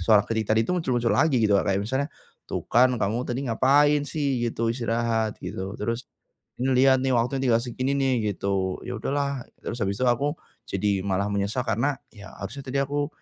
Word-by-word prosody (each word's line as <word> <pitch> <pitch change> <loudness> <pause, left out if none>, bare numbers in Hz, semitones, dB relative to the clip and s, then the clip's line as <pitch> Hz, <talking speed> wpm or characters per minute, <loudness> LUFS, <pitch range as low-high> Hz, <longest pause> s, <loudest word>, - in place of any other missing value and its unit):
suara 105 +3 +5
kritik 110 -1 -2
tadi 110 +1 +4
itu - - -4
muncul-muncul 125 -9 +1
lagi 150 -2 +3
gitu 105 -2 +4
Kak, - - -4
kayak 100 0 +1
misalnya, 130 +7 -1 0.4
"Tuh - - -3
kan 125 +3 +5
kamu 110 +4 0
tadi 130 +2 -3
ngapain 145 +5 +4
sih 140 -4 -1
gitu 115 0 -1
istirahat 115 -2 -1
gitu, 95 +1 -5
terus 115 +3 -3 0.5
ini 130 +2 0
lihat 135 -1 +6
nih 130 -1 +1
waktunya 125 +3 +1
tinggal 115 -1 +3
segini 130 +2 -2
nih," 135 -1 +1 0.2
gitu 95 -1 -1
ya 125 -2 -5
udahlah 140 0 -2 0.2
terus 120 - -4
habis 100 0 -1
itu 130 - +1
aku, 140 +5 +1 0.3
jadi 105 -3 -1 0.2
malah 100 +1 0
menyesal 100 +5 -1
karena 120 +6 +1 0.2
ya 105 -2 -11
harusnya 125 +8 -6
tadi 130 +1 -2
aku, 145 +1 -1
120 Hz, 190 wpm, -25 LUFS, 110-135 Hz, 0.5 s, lihat